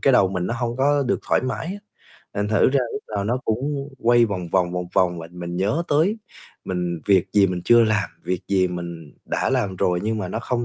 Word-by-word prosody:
cái 135 Hz, -, +5 dB
đầu 95 Hz, -6 st, +5 dB
mình 90 Hz, -2 st, -2 dB
nó 115 Hz, -, -2 dB
hông 120 Hz, 0 st, -2 dB
có 145 Hz, +1 st, +3 dB
được -, -, +1 dB
thoải -, -, +3 dB
mái 130 Hz, +5 st, -3 dB
á, 195 Hz, +4 st, -5 dB, 0.6 s
thành 105 Hz, +1 st, -1 dB
thử 110 Hz, -2 st, +4 dB
ra 140 Hz, -, +3 dB
lúc 210 Hz, -, -5 dB
nào 100 Hz, -, -1 dB
nó 120 Hz, +5 st, 0 dB
cũng 140 Hz, +5 st, -2 dB
quay 120 Hz, 0 st, +4 dB
vòng 95 Hz, -6 st, -3 dB
vòng, 90 Hz, -1 st, +1 dB
vòng 90 Hz, 0 st, -3 dB
vòng. 90 Hz, -2 st, +2 dB
Và 80 Hz, 0 st, -8 dB
mình 85 Hz, 0 st, -6 dB
nhớ 105 Hz, -, +1 dB
tới 165 Hz, +10 st, +2 dB, 0.5 s
mình 90 Hz, -2 st, -2 dB
việc 95 Hz, -2 st, +4 dB
gì 100 Hz, -1 st, +5 dB
mình 90 Hz, -2 st, -3 dB
chưa 120 Hz, +3 st, +6 dB
làm, 110 Hz, -3 st, +1 dB, 0.2 s
việc 90 Hz, -1 st, -1 dB
gì 95 Hz, -2 st, +3 dB
mình 85 Hz, -3 st, -7 dB
đã -, -, -1 dB
làm 95 Hz, -2 st, 0 dB
rồi 90 Hz, 0 st, +1 dB
nhưng 110 Hz, +1 st, -1 dB
mà 95 Hz, -3 st, -3 dB
nó 105 Hz, -, -3 dB
không 120 Hz, -1 st, -1 dB
100 Hz, 235 wpm, -23 LUFS, 90-120 Hz, 0.6 s, chưa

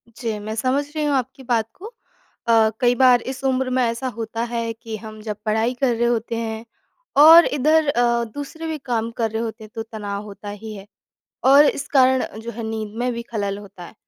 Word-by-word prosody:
जी, 225 Hz, -4 st, -3 dB
मैं 215 Hz, +1 st, -5 dB
समझ 260 Hz, +5 st, 0 dB
रही 305 Hz, -, -1 dB
हूँ 285 Hz, -1 st, +1 dB
आपकी 260 Hz, +1 st, -3 dB
बात 230 Hz, -3 st, 0 dB
को। 395 Hz, -, -13 dB, 0.6 s
अ, 225 Hz, -1 st, +5 dB
कई 245 Hz, -1 st, +3 dB
बार 250 Hz, -2 st, +5 dB
इस 270 Hz, +1 st, -9 dB
उम्र 260 Hz, -1 st, +1 dB
में 255 Hz, 0 st, +1 dB
ऐसा 235 Hz, +3 st, -1 dB
होता 225 Hz, +1 st, -3 dB
है 230 Hz, -1 st, -2 dB
कि 225 Hz, -1 st, -8 dB
हम 215 Hz, 0 st, -10 dB
जब 210 Hz, -1 st, -5 dB
पढ़ाई 220 Hz, +3 st, +1 dB
कर 245 Hz, -3 st, +2 dB
रहे 235 Hz, +1 st, +1 dB
होते 230 Hz, -1 st, -1 dB
हैं, 225 Hz, 0 st, -4 dB, 0.5 s
और 325 Hz, +3 st, +9 dB
इधर 305 Hz, +2 st, +2 dB
अ, 240 Hz, -2 st, +2 dB
दूसरे 285 Hz, +7 st, -7 dB
भी 315 Hz, -1 st, -3 dB
काम 235 Hz, -4 st, -2 dB
कर 225 Hz, -2 st, 0 dB
रहे 225 Hz, +1 st, -2 dB
होते 225 Hz, -1 st, -5 dB
हैं, 215 Hz, -, -13 dB
तो 225 Hz, -, -3 dB
तनाव 205 Hz, -2 st, -6 dB
होता 205 Hz, 0 st, -9 dB
ही 215 Hz, +1 st, -8 dB
है। 195 Hz, +1 st, -11 dB, 0.6 s
और 280 Hz, +3 st, +7 dB
इस 280 Hz, -, 0 dB
कारण, 260 Hz, -2 st, +4 dB, 0.2 s
जो 235 Hz, +1 st, -6 dB
है 230 Hz, +1 st, -7 dB
नींद 220 Hz, -1 st, -5 dB
में 245 Hz, 0 st, 0 dB
भी 235 Hz, 0 st, -5 dB
ख़लल 200 Hz, -2 st, -2 dB
होता 195 Hz, -3 st, -11 dB
है। -, -, -13 dB
230 Hz, 215 wpm, -21 LUFS, 220-260 Hz, 0.6 s, और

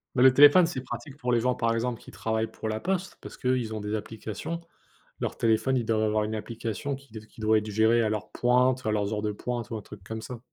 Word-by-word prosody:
Mais 125 Hz, -, +4 dB
le 130 Hz, -, +8 dB
téléphone, 145 Hz, +6 st, +8 dB
c'est 150 Hz, -6 st, -3 dB
pratique 125 Hz, +3 st, -7 dB
pour 125 Hz, -3 st, -1 dB
les 120 Hz, -, +4 dB
gens, 125 Hz, +2 st, +2 dB
par 115 Hz, -1 st, +1 dB
exemple, 120 Hz, 0 st, -2 dB
qui -, -, -13 dB
travaillent 110 Hz, 0 st, -2 dB
pour 110 Hz, -, -6 dB
la 110 Hz, 0 st, -2 dB
poste, 190 Hz, +1 st, -2 dB
parce -, -, -10 dB
qu'eux 130 Hz, 0 st, +1 dB
ils 110 Hz, -2 st, -4 dB
ont 110 Hz, -, -4 dB
des 105 Hz, +1 st, -4 dB
applications. 110 Hz, -, -5 dB, 0.6 s
Leur -, -, -3 dB
téléphone, 115 Hz, +4 st, +2 dB
ils 120 Hz, -, -1 dB
doivent 110 Hz, -1 st, +1 dB
avoir 110 Hz, 0 st, +2 dB
une 110 Hz, +1 st, -3 dB
application 115 Hz, +4 st, -4 dB
qui 135 Hz, -2 st, -16 dB, 0.2 s
qui 110 Hz, -, -14 dB
doit 110 Hz, 0 st, +4 dB
être 105 Hz, -, -7 dB
géré 110 Hz, +3 st, +4 dB
à 110 Hz, -, +1 dB
leur 105 Hz, -1 st, -3 dB
pointe, 125 Hz, +1 st, +2 dB
à 110 Hz, -, +1 dB
leurs 105 Hz, 0 st, 0 dB
heures 105 Hz, -, -1 dB
de 105 Hz, -, 0 dB
pointe 120 Hz, +2 st, -4 dB
ou -, -, -2 dB
un 105 Hz, -, -7 dB
truc 100 Hz, -1 st, -12 dB
comme 110 Hz, +2 st, -6 dB
ça. 125 Hz, 0 st, -7 dB
115 Hz, 260 wpm, -27 LUFS, 110-125 Hz, 0.6 s, le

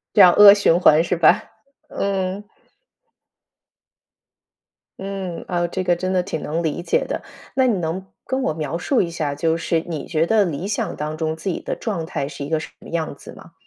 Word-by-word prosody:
这 205 Hz, -, +7 dB
样 180 Hz, -, +9 dB
恶 205 Hz, -1 st, +10 dB
循 190 Hz, -4 st, +3 dB
环 160 Hz, -2 st, +5 dB
是 175 Hz, -, -1 dB
吧？ 170 Hz, +4 st, +4 dB, 0.5 s
嗯。 195 Hz, 0 st, -2 dB, 2.6 s
嗯， 195 Hz, -3 st, -5 dB
啊， 175 Hz, -1 st, 0 dB
这 185 Hz, +2 st, -3 dB
个 175 Hz, -1 st, +2 dB
真 185 Hz, +2 st, -2 dB
的 185 Hz, -, +2 dB
挺 160 Hz, -4 st, -5 dB
能 160 Hz, +3 st, -2 dB
理 160 Hz, +1 st, -2 dB
解 -, -, +1 dB
的。 -, -, -4 dB, 0.3 s
那 260 Hz, -1 st, +3 dB
你 220 Hz, -7 st, +1 dB
能 175 Hz, +3 st, -3 dB, 0.2 s
跟 265 Hz, 0 st, -1 dB
我 155 Hz, -, 0 dB
描 155 Hz, +1 st, -3 dB
述 250 Hz, +8 st, +1 dB
一 170 Hz, -, -1 dB
下， 155 Hz, -4 st, -3 dB
就 160 Hz, +3 st, 0 dB
是 165 Hz, 0 st, 0 dB
你 160 Hz, -4 st, -4 dB
觉 165 Hz, 0 st, 0 dB
得 215 Hz, -3 st, +3 dB
理 170 Hz, +3 st, -4 dB
想 210 Hz, -, -2 dB
当 150 Hz, +1 st, -4 dB
中 160 Hz, -1 st, -2 dB
自 190 Hz, +4 st, -4 dB
己 170 Hz, -, -2 dB
的 -, -, -4 dB
状 190 Hz, -8 st, -3 dB
态 140 Hz, -, -3 dB
是 140 Hz, -1 st, -7 dB
一 -, -, -7 dB
个 160 Hz, -1 st, +1 dB
什 160 Hz, -, -8 dB
么 -, -, -13 dB
样 160 Hz, -3 st, -3 dB
子 -, -, -12 dB
吗？ -, -, -15 dB
170 Hz, 220 characters per minute, -21 LUFS, 160-190 Hz, 2.6 s, 恶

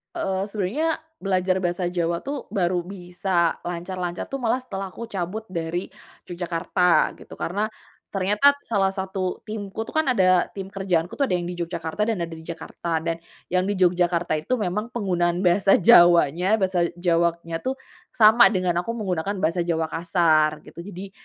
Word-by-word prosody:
Eee, 190 Hz, -1 st, -1 dB
sebenarnya, 215 Hz, -, -1 dB, 0.3 s
belajar 185 Hz, -1 st, 0 dB
bahasa 175 Hz, -1 st, -1 dB
Jawa 170 Hz, -1 st, -1 dB
tuh 280 Hz, -1 st, -5 dB
baru 175 Hz, -2 st, 0 dB
bisa 180 Hz, -2 st, -1 dB
lancar-lancar 175 Hz, 0 st, -4 dB
tuh 275 Hz, -, -3 dB
malah 250 Hz, 0 st, 0 dB
setelah 195 Hz, -6 st, -6 dB
aku 235 Hz, 0 st, -7 dB
cabut 195 Hz, +3 st, -4 dB
dari 170 Hz, 0 st, -3 dB, 0.4 s
Yogyakarta 175 Hz, +1 st, +1 dB
gitu. -, -, -13 dB
Karena 200 Hz, +5 st, -2 dB, 0.4 s
ternyata 210 Hz, +9 st, +3 dB
salah 200 Hz, -4 st, +1 dB
satu 190 Hz, -1 st, -3 dB
timku 215 Hz, 0 st, -5 dB
tuh, -, -, -10 dB
kan 310 Hz, -, 0 dB
ada 185 Hz, -6 st, +4 dB
tim 195 Hz, -1 st, -6 dB
kerjaanku 180 Hz, -, -1 dB
tuh 275 Hz, -, +3 dB
ada 180 Hz, -, +1 dB
yang 175 Hz, -, -2 dB
di 175 Hz, 0 st, -5 dB
Yogyakarta 170 Hz, +4 st, -2 dB
dan 225 Hz, -3 st, 0 dB
ada 165 Hz, -, -6 dB
di 160 Hz, 0 st, -9 dB
Jakarta. 165 Hz, -1 st, -4 dB
Dan 165 Hz, 0 st, -1 dB, 0.3 s
yang 185 Hz, +1 st, +1 dB
di 205 Hz, -, +1 dB
Yogyakarta 175 Hz, -2 st, +2 dB
itu 165 Hz, +12 st, -1 dB
memang 210 Hz, 0 st, -2 dB
penggunaan 180 Hz, -4 st, 0 dB
bahasa 190 Hz, +2 st, +4 dB
Jawanya 175 Hz, +2 st, +5 dB
bahasa 185 Hz, -4 st, +1 dB
Jawanya 170 Hz, -1 st, 0 dB
tuh 260 Hz, +1 st, -2 dB, 0.4 s
sama 225 Hz, +1 st, +7 dB
dengan 180 Hz, -3 st, 0 dB
aku 230 Hz, +5 st, -4 dB
menggunakan 195 Hz, -1 st, -2 dB
bahasa 175 Hz, +2 st, +1 dB
Jawa 165 Hz, -1 st, 0 dB
kasar, 165 Hz, -2 st, +2 dB
gitu. -, -, -13 dB
Jadi, 190 Hz, +1 st, -8 dB
180 Hz, 160 wpm, -24 LUFS, 170-200 Hz, 0.4 s, sama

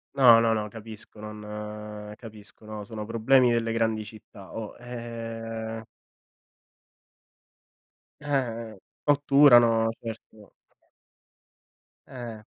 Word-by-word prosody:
No, 120 Hz, -4 st, +8 dB
no, 115 Hz, -1 st, +3 dB
no, 105 Hz, -1 st, -1 dB
capisco 110 Hz, 0 st, -8 dB
non 105 Hz, 0 st, -7 dB
capisco 110 Hz, -2 st, -11 dB
no, 110 Hz, -1 st, -6 dB
sono 105 Hz, +1 st, -6 dB
problemi 120 Hz, +3 st, +4 dB
delle 115 Hz, -1 st, +1 dB
grandi 110 Hz, -1 st, 0 dB
città 105 Hz, -2 st, -13 dB
o, 110 Hz, -2 st, -6 dB
ehm 115 Hz, -2 st, -6 dB, 2.4 s
Eh 120 Hz, -7 st, -2 dB, 0.3 s
otturano, 135 Hz, -6 st, +6 dB
certo. 110 Hz, -3 st, -10 dB, 1.6 s
Eh. 115 Hz, -4 st, -8 dB
115 Hz, 85 wpm, -27 LUFS, 105-120 Hz, 2.4 s, No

